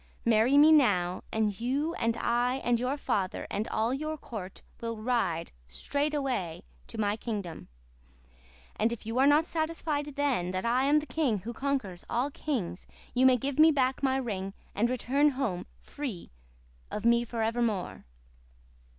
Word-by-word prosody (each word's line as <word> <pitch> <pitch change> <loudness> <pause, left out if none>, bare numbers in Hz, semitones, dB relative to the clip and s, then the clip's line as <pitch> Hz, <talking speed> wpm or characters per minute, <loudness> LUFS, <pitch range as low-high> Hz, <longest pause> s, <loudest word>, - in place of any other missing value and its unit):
Marry 230 +4 +4
me 300 +2 +8
now, 185 - +3
and 215 -1 -1
you 280 +7 0
and 230 -5 0
I 240 +2 +1
and 240 -1 +2
your 255 +4 -1
father 190 -9 -1
and 210 +3 -2
all 225 +2 0
your 310 +3 -3
court 200 -9 -8 0.2
will 230 -1 -3
ride 215 -8 -1 0.2
straightway 270 - -2 0.2
to - - -9
my 205 -1 +1
kingdom; 205 -7 -5 1.1
and 225 +2 +2
if 235 -3 -6
you 225 +3 -1
are 270 - +6
not 295 +2 +5
satisfied 315 -3 -2
then 270 -11 0
that 185 +4 -2
I 250 +3 +2
am 295 +2 +4
the - - -8
king 250 - 0
who 235 +4 -6
conquers 235 -9 -2
all 255 +5 0
kings 235 - -3 0.3
you 255 +1 +5
may 255 -1 +5
give 275 +4 -3
me 320 +1 +8
back 265 -3 +1
my 265 -1 +2
ring 200 -6 -3 0.2
and 230 +4 +1
return 265 +4 +2
home 220 -10 -2 0.2
free 255 -12 -6 0.6
of 210 - -5
me 235 0 +5
forever 230 0 -1
more. 210 -6 -2
240 Hz, 160 wpm, -29 LUFS, 215-280 Hz, 1.1 s, me